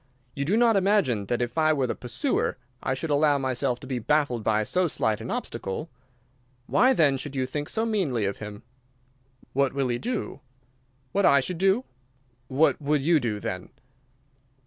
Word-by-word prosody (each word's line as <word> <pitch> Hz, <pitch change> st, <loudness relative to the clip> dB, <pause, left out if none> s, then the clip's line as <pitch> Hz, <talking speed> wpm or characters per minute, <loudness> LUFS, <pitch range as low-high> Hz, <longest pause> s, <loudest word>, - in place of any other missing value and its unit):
You 140 Hz, -, -3 dB
do 195 Hz, +8 st, +2 dB
not 230 Hz, -2 st, +4 dB
imagine 190 Hz, -, +2 dB
that 120 Hz, +2 st, 0 dB
if 120 Hz, +7 st, -3 dB
I 155 Hz, 0 st, +4 dB
were 135 Hz, -3 st, +1 dB
the 125 Hz, -, -1 dB
pursuer 255 Hz, -, -1 dB, 0.2 s
I 130 Hz, -, -1 dB
should 150 Hz, +4 st, -4 dB
allow 145 Hz, 0 st, +4 dB
myself 130 Hz, -1 st, -1 dB
to -, -, -9 dB
be 130 Hz, -2 st, -3 dB
baffled 125 Hz, -2 st, +1 dB
by 110 Hz, 0 st, +2 dB
so 180 Hz, -, +1 dB
slight 110 Hz, -7 st, 0 dB
an -, -, -6 dB
obstacle. 150 Hz, -, -4 dB, 0.7 s
Why, 255 Hz, -, +4 dB
then, 150 Hz, -, +3 dB
should 140 Hz, +1 st, -6 dB
you 130 Hz, -1 st, 0 dB
think 145 Hz, +3 st, -4 dB
so 225 Hz, 0 st, -1 dB
meanly 170 Hz, -, 0 dB
of 100 Hz, -, -2 dB
him?" 105 Hz, -1 st, -8 dB, 0.9 s
"What 140 Hz, 0 st, +1 dB
will 135 Hz, -2 st, 0 dB
he 120 Hz, 0 st, -1 dB
do?" 245 Hz, -9 st, -3 dB, 0.7 s
"What 200 Hz, -1 st, +3 dB
I 140 Hz, -, +6 dB
should 165 Hz, +6 st, -3 dB
do?" 195 Hz, +6 st, +3 dB, 0.6 s
"What 145 Hz, +5 st, +2 dB
would 145 Hz, -1 st, +1 dB
you 165 Hz, +1 st, +4 dB
do, 110 Hz, -5 st, -2 dB
then?" 90 Hz, -2 st, -5 dB
140 Hz, 180 wpm, -26 LUFS, 120-170 Hz, 0.9 s, I